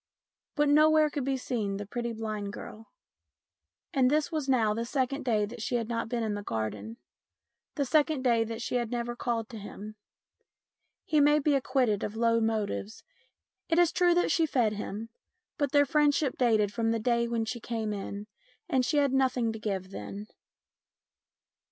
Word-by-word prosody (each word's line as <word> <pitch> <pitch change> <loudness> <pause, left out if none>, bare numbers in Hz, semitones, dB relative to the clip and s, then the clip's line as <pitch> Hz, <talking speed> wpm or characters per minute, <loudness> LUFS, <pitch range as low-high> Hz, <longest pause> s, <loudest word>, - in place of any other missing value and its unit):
But 295 -1 +2
nowhere 305 +1 +5
could 285 -3 -3
be 270 -1 0
seen 215 -6 -2
the 205 - -5
pretty 235 +3 -4
blind 215 -2 -4
girl. 220 +1 -9 1.1
And 260 -4 +4
this 305 +3 +1
was 305 -4 -2
now 225 -5 +3
the 230 +2 -2
second 270 +3 -1
day 215 -4 +2
that 230 +2 -9
she 245 - -2
had 230 -1 -1
not 230 -1 -2
been 235 -1 -1
in 215 -1 -1
the 205 - -4
garden, 110 - -4 0.8
the 285 - 0
second 300 -1 +2
day 235 -3 +3
that 225 +1 -5
she 250 - -1
had 240 -2 -2
never 240 0 -3
called 235 -2 -2
to 230 -3 -8
him. 210 +1 -8 1.1
He 305 - +2
may 295 +1 +5
be 300 0 +2
acquitted 255 -6 +1
of 210 - -4
low 230 0 +2
motives. 220 -1 -2 0.7
It 330 - +2
is 345 -1 +5
true 350 0 +3
that 355 - +2
she 325 -1 +2
fed 235 -7 +1
him, 210 +2 -5 0.5
but 285 -3 0
their 285 0 +5
friendship 295 -3 +2
dated 215 -5 +2
from 230 -1 0
the 230 0 +1
day 235 +1 +1
when 230 -1 -1
she 240 +2 -4
came 220 -2 -3
in, 200 0 -5 0.4
and 260 -1 +2
she 295 +4 0
had 280 -2 +3
nothing 255 -4 +1
to 220 - -7
give 195 -3 -3
then. 200 +1 -7
235 Hz, 180 wpm, -29 LUFS, 215-275 Hz, 1.1 s, nowhere